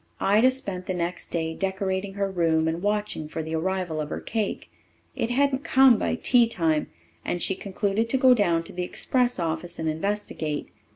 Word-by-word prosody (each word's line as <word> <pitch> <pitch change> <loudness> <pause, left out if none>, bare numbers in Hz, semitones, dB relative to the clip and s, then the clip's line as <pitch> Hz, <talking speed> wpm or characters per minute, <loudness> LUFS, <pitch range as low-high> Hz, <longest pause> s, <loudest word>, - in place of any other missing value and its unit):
Ida 215 +6 +4
spent 195 -9 -3
the 185 - -1
next 175 0 -3
day 160 -1 -2
decorating 190 +1 -2
her 200 -1 0
room 165 -4 +1
and 165 +1 -2
watching 205 -6 -2
for 160 0 -4
the 160 +1 -5
arrival 175 -1 -1
of 150 - -5
her - - -4
cake. 215 -3 -3 0.4
It 230 - -1
hadn't 275 +2 +1
come 260 -4 +5
by - - 0
tea 240 -1 +4
time, 160 -8 0 0.4
and 175 - -2
she 190 - +2
concluded 200 +3 -2
to 265 - +2
go 260 -1 +6
down 175 -8 +2
to - - -10
the 180 - -3
express 245 +7 0
office 165 0 -3
and 160 - -3
investigate. 160 -3 -2
190 Hz, 185 wpm, -25 LUFS, 165-220 Hz, 0.4 s, go